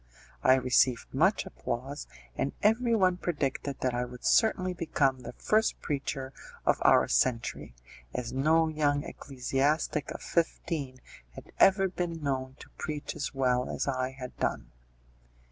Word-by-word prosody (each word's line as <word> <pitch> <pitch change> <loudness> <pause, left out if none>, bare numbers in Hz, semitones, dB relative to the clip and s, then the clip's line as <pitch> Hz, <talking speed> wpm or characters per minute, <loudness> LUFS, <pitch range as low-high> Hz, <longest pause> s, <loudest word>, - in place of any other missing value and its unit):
I 130 - +6
received 125 -1 +2
much - - +3
applause, 130 +5 -5 0.3
and 140 - -1
every 230 +2 +3
one 185 -4 +3
predicted 140 -5 -2
that 130 -1 0
I 120 0 0
would 125 0 -9
certainly 185 -5 +3
become 140 -6 0
the 125 - -8
first 215 - +1
preacher 135 -2 -3 0.3
of - - +3
our - - +5
century, 115 - 0 0.4
as 120 - -4
no 160 +5 +3
young 145 -2 +1
ecclesiastic 140 +3 -1
of - - -7
fifteen 155 -6 -2 0.3
had - - -11
ever 195 0 +5
been 175 -3 -4
known 130 -2 -2
to - - -13
preach 150 -1 -4
as 140 - -4
well 125 -2 +1
as - - -2
I 130 -1 0
had 125 -2 -7
done. - - -2
140 Hz, 145 wpm, -29 LUFS, 130-165 Hz, 0.4 s, I